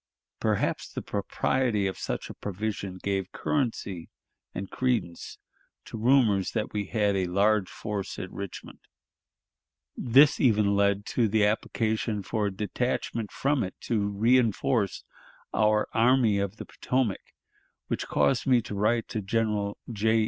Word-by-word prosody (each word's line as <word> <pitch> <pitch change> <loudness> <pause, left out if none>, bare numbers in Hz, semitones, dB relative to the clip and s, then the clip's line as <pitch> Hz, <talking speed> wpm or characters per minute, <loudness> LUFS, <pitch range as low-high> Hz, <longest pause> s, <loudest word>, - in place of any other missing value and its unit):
Perhaps - - -1
the - - -4
propriety 120 -6 0
of 95 - -1
such - - -3
provision 100 -1 -4
gave 95 -2 -1
currency 110 - -2 0.4
and 95 +1 -5
credence 120 -10 -2 0.5
to - - -8
rumors 110 -4 +3
that 110 -2 -2
we 105 -1 -1
had 105 -2 +1
a 95 -2 0
large 100 +2 +2
force 105 -3 -5
at 95 - -6
Richmond. 100 -2 -8 1.2
This 135 +4 +5
even 105 -5 +3
led 100 0 +2
to 120 -3 +3
the 105 0 +3
application 110 0 -1
for 105 +1 -1
a - - -2
detachment 110 +2 -2
from 140 0 +1
it 95 - -5
to 105 -3 -1
reënforce 115 0 +2 0.5
our 105 0 +3
Army 115 -2 +4
of 100 0 -2
the - - -8
Potomac, 125 -6 -1 0.6
which - - -3
caused 135 -1 +1
me 125 -2 +5
to 105 - -6
write 110 +3 +1
to 110 - -3
General 105 -1 -1 0.2
J. 110 +1 +2
105 Hz, 135 wpm, -27 LUFS, 100-115 Hz, 1.2 s, This